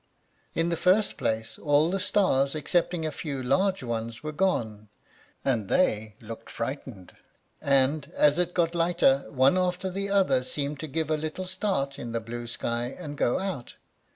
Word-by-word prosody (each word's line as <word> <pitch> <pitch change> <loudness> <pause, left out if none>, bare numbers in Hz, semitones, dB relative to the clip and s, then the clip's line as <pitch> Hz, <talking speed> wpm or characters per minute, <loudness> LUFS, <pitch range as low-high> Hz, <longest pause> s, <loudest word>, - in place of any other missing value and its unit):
In 165 +1 +1
the 170 - 0
first 190 +5 +3
place, 110 0 -2
all 150 +2 +3
the 195 - 0
stars 140 -9 +2
excepting 165 +2 0
a 155 - -1
few 140 -5 -4
large 190 +6 +1
ones 115 0 -4
were 155 - -3
gone, 110 - -1 0.6
and 115 -7 +1
they 110 - +1
looked 115 -1 -9
frightened; 115 -6 -6 0.5
and 140 +2 +2
as 150 +2 +4
it 175 0 0
got 170 -1 +2
lighter, 165 -5 +3
one 135 +6 +4
after 180 +1 -1
the 200 +2 -3
other 195 -9 +3
seemed 140 +2 -3
to 155 - -5
give 155 +1 -2
a 155 - +2
little 155 +4 -4
start 185 -8 -1
in 120 -1 -6
the 115 - 0
blue 120 +1 -6
sky 120 +1 -2
and 150 -5 -6
go 120 - +1
out. 185 -11 -4
145 Hz, 170 wpm, -27 LUFS, 120-175 Hz, 0.6 s, as